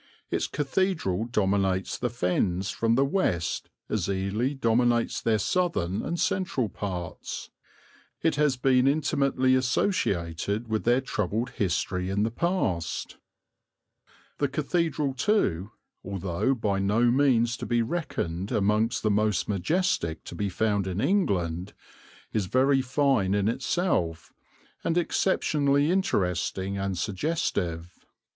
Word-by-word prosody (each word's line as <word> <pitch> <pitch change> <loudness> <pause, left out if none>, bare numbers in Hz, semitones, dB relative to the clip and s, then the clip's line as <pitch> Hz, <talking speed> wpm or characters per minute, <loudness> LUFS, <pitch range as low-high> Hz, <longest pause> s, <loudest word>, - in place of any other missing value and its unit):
Its - - 0
cathedral 145 - 0
dominates 95 -4 0
the 125 - -2
Fens 95 -3 0
from 115 0 +1
the 135 +2 +3
west 135 - -1 0.2
as - - -1
Ely 100 +7 -1
dominates 120 -2 +1
their 110 -1 +2
southern 105 - 0
and 170 - -3
central 160 - 0
parts; 90 -3 -5 0.7
it 165 - +3
has 145 -3 +2
been 130 0 +3
intimately 140 -3 +2
associated 105 - 0
with 110 -1 -2
their 120 +2 +4
troubled 110 -1 -2
history 90 -1 -1
in 100 +2 +1
the 110 - 0
past. 115 - -1 1.2
The 145 - +2
cathedral 155 0 -1
too, 130 - +1 0.3
although 95 +6 -1
by 100 -4 0
no 110 +5 +3
means 120 -3 +3
to - - -6
be 120 -1 +2
reckoned 100 - -3
amongst 105 +4 +1
the 110 - +2
most 105 -1 +1
majestic 100 - 0
to - - -9
be 100 +3 -2
found 100 0 0
in 95 +1 -3
England, 95 - 0 0.6
is 105 -4 0
very 135 +4 +3
fine 130 -7 +2
in 100 0 +1
itself, 115 - -1 0.5
and 165 - 0
exceptionally 150 -4 +2
interesting 95 - 0
and 95 -1 -2
suggestive. 90 - -2
110 Hz, 120 wpm, -27 LUFS, 95-140 Hz, 1.2 s, their